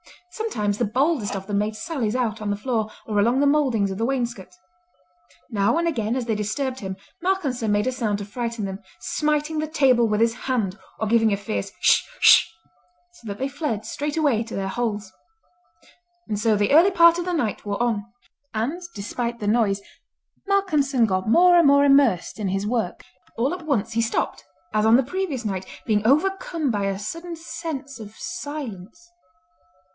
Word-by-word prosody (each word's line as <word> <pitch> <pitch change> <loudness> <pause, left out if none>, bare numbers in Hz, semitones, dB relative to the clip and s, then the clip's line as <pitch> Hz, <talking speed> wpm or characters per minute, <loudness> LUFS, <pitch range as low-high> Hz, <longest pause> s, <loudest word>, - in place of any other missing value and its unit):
Sometimes 215 - -2
the 240 - +2
boldest 255 0 0
of 195 -1 -5
them 200 0 -1
made 210 +1 -1
sallies 245 -5 -2
out 225 -4 -1
on 210 - -3
the 205 - 0
floor 220 0 -2 0.2
or 210 -2 0
along 235 +6 +3
the 285 - +3
mouldings 265 -9 +2
of 190 - -5
the 225 - +1
wainscot. 240 - -3 1.0
Now 205 +6 +2
and 340 0 +1
again 230 -7 -1
as 255 -2 -2
they 230 - 0
disturbed 250 +6 -2
him 190 -1 -5 0.3
Malcolmson 295 - 0
made 205 0 +2
a 255 - +1
sound 225 -5 -1
to 205 - -6
frighten 230 0 -4
them, 190 0 -5 0.2
smiting 300 +1 -1
the 310 - -1
table 260 -6 +3
with 210 -1 0
his 230 0 +3
hand 225 -6 -2 0.2
or 220 - -2
giving 225 0 +3
a 200 - +1
fierce 205 +2 -4
"Hsh, - - +4
hsh," - - +7 0.6
so 295 -10 -15
that 200 -1 -5
they 265 - -1
fled 275 -7 -3
straightway 290 -5 0
to 225 - -8
their 195 0 -2
holes. 210 -3 -3 1.1
And 210 -2 -2
so 220 0 +3
the 205 0 +1
early 340 +6 +7
part 335 -2 +6
of 350 - -3
the 360 - -2
night 240 -11 -1
wore 205 +2 -3
on; 220 -4 0 0.5
and 265 +12 -2
despite 235 +3 -4
the 205 - -3
noise 205 -3 +2 0.7
Malcolmson 300 -11 +2
got 190 0 -1
more 355 +7 +6
and 335 -4 +6
more 280 0 +6
immersed 275 -10 +3
in 205 - -1
his 195 +2 -1
work. 220 -4 -2 0.3
All 260 +8 +1
at 350 -3 -7
once 230 -6 0
he 230 0 +1
stopped, 225 - -1 0.3
as 215 0 +2
on 220 +1 +6
the 265 - +4
previous 295 -5 -3
night, 190 -2 -3 0.2
being 215 -1 +1
overcome 325 0 +1
by 205 -2 -1
a 195 -1 -1
sudden 335 - -6
sense 315 -5 -6
of 215 0 -10
silence. 290 - -7
235 Hz, 185 wpm, -23 LUFS, 210-290 Hz, 1.1 s, hsh